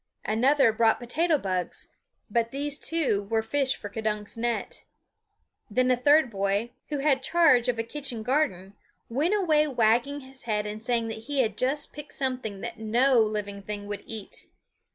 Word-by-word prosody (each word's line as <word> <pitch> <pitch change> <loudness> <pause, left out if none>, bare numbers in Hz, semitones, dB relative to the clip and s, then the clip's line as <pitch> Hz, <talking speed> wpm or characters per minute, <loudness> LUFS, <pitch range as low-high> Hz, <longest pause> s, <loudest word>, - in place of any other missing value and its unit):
Another 250 +3 +4
brought 225 0 +3
potato 310 +7 +1
bugs; 185 -6 -3 0.4
but 230 +1 0
these 280 +2 -2
too 265 -12 0
were 225 -1 +1
fish 265 +3 +1
for 205 - -7
K'dunk's 210 0 -3
net. 235 - -2 0.9
Then 255 +4 +2
a - - +5
third 285 +1 +4
boy, 200 +3 0 0.2
who 295 - -1
had 275 -1 +2
charge 265 -6 +4
of 240 - 0
a 225 - 0
kitchen 245 -2 -5
garden, 210 - 0 0.4
went 300 - +1
away 310 -7 +3
wagging 245 +3 +2
his 265 -1 -13
head 210 -2 0
and 210 +1 -6
saying 230 -2 0
that 220 0 -7
he 285 -2 +2
had 220 -4 -1
just 275 +5 -1
picked 295 0 -9
something 250 -7 -2
that 235 -2 -6
no 240 +4 +3
living 210 -2 -1
thing 205 0 -4
would 205 0 -5
eat. 220 -3 -5
235 Hz, 170 wpm, -27 LUFS, 215-280 Hz, 0.9 s, a